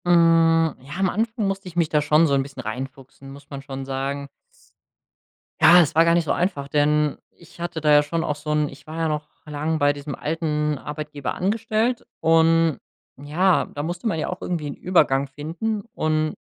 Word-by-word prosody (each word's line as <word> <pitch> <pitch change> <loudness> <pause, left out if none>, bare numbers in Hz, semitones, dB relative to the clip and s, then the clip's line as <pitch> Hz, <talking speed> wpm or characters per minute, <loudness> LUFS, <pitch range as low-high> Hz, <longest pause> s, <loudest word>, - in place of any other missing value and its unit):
Hm, 165 -2 +4
ja, 135 +2 -11
am 190 0 +2
Anfang 225 +3 -1
musste 195 0 -3
ich 175 - -10
mich 170 -2 +2
da 150 - +2
schon 150 +2 +4
so 145 - +1
'n 135 - +3
bisschen 135 -1 -8
reinfuchsen, 135 +4 -8
muss 140 +1 -14
man 140 -1 -6
schon 135 -1 -7
sagen. 135 +1 -4 1.3
Ja, 175 +1 +8
es 155 - 0
war 165 +1 +6
gar 170 - +4
nicht 170 -1 +1
so - - -1
einfach, 175 -7 -1
denn 150 +1 +1
ich 170 0 -19
hatte 170 -2 -4
da 150 0 +3
ja 145 0 +6
schon 160 +2 -2
auch 150 - -1
so 150 +1 -5
'n 150 -1 +1
ich 135 - -14
war 155 +1 -7
ja 165 -1 0
noch 150 -1 -3 0.2
lang 155 +1 -2
bei 145 0 +4
diesem 145 0 -6
alten 150 -1 -1
Arbeitgeber 150 -1 -5
angestellt 220 +4 -1
und, 165 -1 +3 0.4
ja, 160 +7 +1
da 145 - -6
musste 175 +7 -4
man 185 -7 -1
ja - - -2
auch 180 - -6
irgendwie 165 -4 -3
'n 140 - -4
Übergang 140 -6 +2
finden 165 +10 -4
und 155 -5 0
155 Hz, 200 wpm, -23 LUFS, 145-170 Hz, 1.3 s, Ja